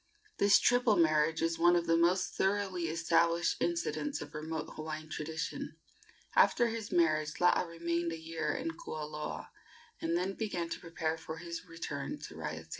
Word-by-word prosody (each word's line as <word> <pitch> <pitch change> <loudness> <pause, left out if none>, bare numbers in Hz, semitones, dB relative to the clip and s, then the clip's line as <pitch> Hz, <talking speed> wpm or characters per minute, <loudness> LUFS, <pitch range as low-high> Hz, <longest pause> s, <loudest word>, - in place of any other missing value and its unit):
This 200 0 +7
triple 245 -3 +4
marriage 160 -1 +3
is 165 0 0
one 175 +1 +6
of 170 -1 +1
the 165 0 +3
most 175 +3 +2
thoroughly 190 -3 0
established 165 +1 +2
incidents 335 -4 -1
of 145 +1 -8
remote 155 0 -4
Hawaiian 155 0 -6
tradition. 160 +1 -4 0.6
After 240 -1 +5
his 225 -2 -5
marriage 155 -3 +2
Laa 180 0 +5
remained 170 0 -1
a 165 - -4
year 160 -1 -3
at - - -3 0.2
Kualoa, 150 0 -5 0.5
and 165 +1 +1
then 185 +2 -1
began 180 -6 -3
to - - -4
prepare 165 -1 -3
for 160 0 -7
his 170 +1 -6
return 150 -4 -5
to - - -8
Raiatea. 80 0 -6
165 Hz, 160 wpm, -32 LUFS, 155-175 Hz, 0.6 s, This